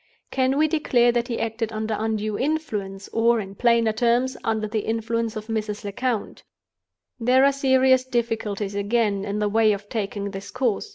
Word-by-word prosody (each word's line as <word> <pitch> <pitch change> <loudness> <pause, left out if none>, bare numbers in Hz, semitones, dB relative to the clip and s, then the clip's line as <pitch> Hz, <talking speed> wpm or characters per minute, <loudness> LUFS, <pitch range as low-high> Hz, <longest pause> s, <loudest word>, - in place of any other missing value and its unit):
"Can 265 +1 +1
we 310 +1 +4
declare 255 -6 +3
that 240 0 -1
he 235 - -3
acted 225 0 -2
under 220 0 -2
undue 215 -1 -2
influence; 210 -10 -3
or, 230 +1 +3
in 195 -2 -6
plainer 230 0 +3
terms, 240 +3 +1
under 220 -1 0
the 215 +1 -1
influence 225 +1 -2
of 215 0 -5
Mrs. 215 -2 -3
Lecount? 215 +2 -3 0.8
"There 255 +3 +4
are 280 - +5
serious 260 -1 +3
difficulties, 225 -5 -2
again, 205 0 0
in 205 0 -3
the 210 0 +1
way 215 0 +3
of 205 0 -7
taking 200 -2 -3
this 195 0 -7
course. 245 - -1
225 Hz, 170 wpm, -24 LUFS, 210-245 Hz, 0.8 s, are